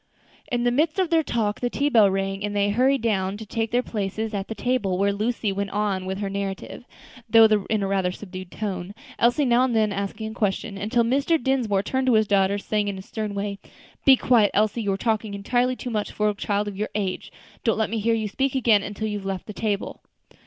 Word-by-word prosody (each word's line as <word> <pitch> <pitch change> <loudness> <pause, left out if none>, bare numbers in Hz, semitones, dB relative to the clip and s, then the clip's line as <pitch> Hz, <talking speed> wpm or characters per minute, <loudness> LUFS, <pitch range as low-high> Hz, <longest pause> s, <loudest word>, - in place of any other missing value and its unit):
In 240 -1 0
the 245 - +3
midst 305 +7 +1
of 370 -3 +1
their 325 -1 +4
talk 220 -8 -1
the 245 - -1
tea 280 +4 0
bell 225 -8 +5
rang, 195 +1 -2
and 205 0 -3
they 205 0 +2
hurried 260 +3 +2
down 195 -3 0
to 220 - -8
take 225 +2 -2
their 245 +2 +1
places 215 0 -3
at 195 -1 -3
the 225 - -5
table, 215 -8 0
where 200 +1 +2
Lucy 215 0 -1
went 200 +1 -2
on 200 -2 -1
with 190 0 -3
her 200 - -1
narrative, 195 +4 -5 0.4
though 225 0 +8 0.2
in 215 -2 +1
a - - 0
rather 190 -2 0
subdued 185 -1 -9
tone, 195 -2 -5 0.2
Elsie 245 +5 +3
now 245 0 +4
and 255 -3 +1
then 215 -1 +2
asking 200 +2 -4
a - - -8
question, 205 0 -2
until 215 +4 +1
Mr. 275 +7 +2
Dinsmore 235 -7 +1
turned 260 +4 -1
to 255 - +4
his 215 0 +4
daughter, 200 -1 +2
saying, 210 0 -1
in 200 - -2
his 190 0 -9
stern 215 -2 -4
way, 200 0 -3 0.4
"Be 270 - +8
quiet, 235 -5 +3
Elsie; 215 +2 +2
you 205 -2 0
are 195 - -1
talking 215 -1 -1
entirely 245 +5 0
too 245 - -6
much 210 -2 -2
for 210 0 +1
a - - 0
child 205 +1 -1
of 205 - -5
your 210 +2 -3
age; 195 -3 -3 0.3
don't 225 - +2
let 220 -2 0
me 225 - -1
hear 225 +2 +2
you 220 -1 -1
speak 270 +6 -1
again 230 -5 +4
until 205 +2 -4
you 210 -1 -3
have 195 - -11
left 190 -1 -3
the 210 - -8
table." 205 -1 -3
210 Hz, 240 wpm, -24 LUFS, 200-235 Hz, 0.4 s, though